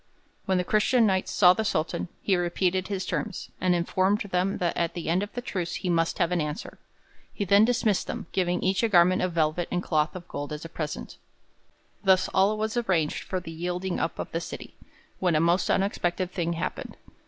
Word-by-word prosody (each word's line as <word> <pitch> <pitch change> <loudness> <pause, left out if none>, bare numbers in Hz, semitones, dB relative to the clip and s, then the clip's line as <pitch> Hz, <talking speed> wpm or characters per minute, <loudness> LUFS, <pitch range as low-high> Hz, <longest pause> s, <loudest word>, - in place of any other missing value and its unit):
When 190 -1 +2
the 180 - +1
Christian 220 +5 +3
Knights 190 -2 +1
saw 180 -2 +6
the 220 - -1
Sultan, 165 -5 -1 0.2
he 195 - +3
repeated 180 +1 0
his 195 -2 -3
terms, 210 -4 -4
and 180 -1 +3
informed 185 +4 +1
them 190 0 0
that 175 -1 -1
at 170 -1 -1
the 170 -2 -4
end 175 +3 +2
of 205 0 -4
the 245 - -5
truce 180 -7 -3
he 180 - -2
must 165 -1 +1
have 170 -1 +1
an 175 -2 +1
answer. 150 0 -5 0.5
He 205 - -3
then 200 +3 +6
dismissed 225 -4 +1
them, - - -4
giving 180 -1 0
each 190 0 +2
a 230 - +2
garment 180 -1 +5
of 185 -1 -1
velvet 165 +1 +1
and 180 0 -1
cloth 155 0 0
of 180 -1 -8
gold 145 +1 -5
as 150 +2 -6
a - - -7
present. 155 -1 -5 0.9
Thus 190 -1 +4
all 200 +3 +3
was 220 +1 -2
arranged 180 -10 0
for 185 - -2
the 170 -2 -9
yielding 180 +2 -3
up - - -2
of - - -5
the - - -2
city, - - -8 0.5
when 180 -3 +2
a - - +4
most 170 +3 +2
unexpected 185 -2 0
thing 170 -1 -1
happened. 165 - -5
180 Hz, 210 wpm, -27 LUFS, 170-195 Hz, 0.9 s, saw